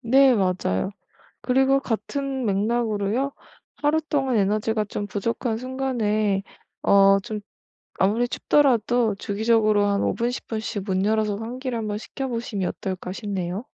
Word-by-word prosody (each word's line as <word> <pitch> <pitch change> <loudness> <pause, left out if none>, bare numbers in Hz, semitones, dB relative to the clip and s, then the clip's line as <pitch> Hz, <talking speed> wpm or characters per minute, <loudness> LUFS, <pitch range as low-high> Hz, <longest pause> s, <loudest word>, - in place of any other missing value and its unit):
네 260 +2 +5
맞아요. 185 - 0 0.5
그리고 265 +2 +3
같은 270 +2 -3
맥락으로요. 220 +4 0 0.4
하루 300 +2 +2
동안 270 -5 0
에너지가 215 +2 +1
좀 205 0 -4
부족한 220 +3 -2
순간에 225 -6 0 0.4
어 195 0 +6
좀 215 -1 -5 0.6
아무리 215 +6 +3
춥더라도 240 -5 +2
주기적으로 215 0 +2
한 200 0 +1
5 - - +1
분 235 0 0
10 250 - -7
분씩 220 -2 -3
문 190 -1 0
열어서 215 -1 +1
환기를 250 +2 -4
한 220 -1 -3
번 205 0 -2
시켜보시면 230 -6 -3
어떨까 185 -1 -5
싶네요. 195 -1 -4
220 Hz, 290 characters per minute, -24 LUFS, 205-250 Hz, 0.6 s, 어